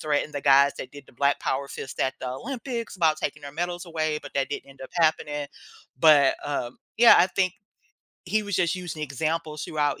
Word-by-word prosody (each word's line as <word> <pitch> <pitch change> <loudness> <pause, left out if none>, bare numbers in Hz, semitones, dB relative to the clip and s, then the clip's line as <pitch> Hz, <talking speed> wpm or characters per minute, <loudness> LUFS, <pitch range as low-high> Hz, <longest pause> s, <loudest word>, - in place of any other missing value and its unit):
threatened 150 0 -1
the 145 - -2
guys 140 0 +6
that 130 - -7
did 145 -1 -12
the - - -19
Black 140 +3 +1
Power 140 +1 -2
fist 135 - -7
at 130 - +1
the 130 - -4
Olympics 235 - -5
about 160 -4 +3
taking 150 -1 -4
their 140 0 -8
medals 175 +3 -3
away, 155 -2 -1
but - - -12
that 135 0 0
didn't 145 - -5
end 135 - -18
up 130 - -9
happening. 150 -3 +1 0.5
But, 145 -3 +6
um, 130 -4 -3 0.2
yeah, 235 +1 +8
I 175 - +6
think 185 -1 0 0.7
he 215 0 0
was 205 -3 -2
just 175 -2 +2
using 175 -4 -6
examples 155 +2 -3
throughout 145 -2 -1
150 Hz, 205 wpm, -25 LUFS, 140-175 Hz, 0.7 s, yeah